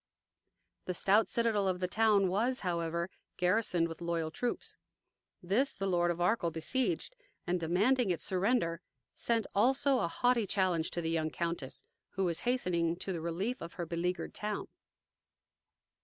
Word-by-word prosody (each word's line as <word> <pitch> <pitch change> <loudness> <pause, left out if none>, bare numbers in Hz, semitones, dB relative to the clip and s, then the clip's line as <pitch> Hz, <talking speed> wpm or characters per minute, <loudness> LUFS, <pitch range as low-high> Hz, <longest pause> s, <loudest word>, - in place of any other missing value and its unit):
The 180 - -3
stout 205 +5 +4
citadel 225 -4 +1
of 185 -1 0
the 180 - 0
town, 210 0 +3
was, 230 +8 +1
however, 170 -1 -1 0.3
garrisoned 180 -2 +2
with 165 0 -9
loyal 170 -2 -1
troops. 245 +8 -3 0.7
This 215 +10 +1
the 195 - -3
Lord 175 -2 +2
of 175 0 -1
Arkell 175 0 +2
beseiged, 260 - -1 0.3
and, 180 0 0
demanding 200 +8 +2
its 175 - 0
surrender, 185 -3 +1 0.3
sent 230 -3 0
also 265 +5 +3
a - - +1
haughty 240 +4 +1
challenge 180 -4 +1
to 175 - -3
the 165 0 -1
young 160 -1 0
countess, 170 -4 -4 0.3
who 195 - -1
was 170 -3 0
hastening 170 -9 +1
to 190 +2 -4
the 170 - -4
relief 185 +10 -2
of 170 - -7
her 175 - -4
beleaguered 175 +2 -2
town. 210 0 -3
180 Hz, 155 wpm, -32 LUFS, 170-220 Hz, 0.7 s, stout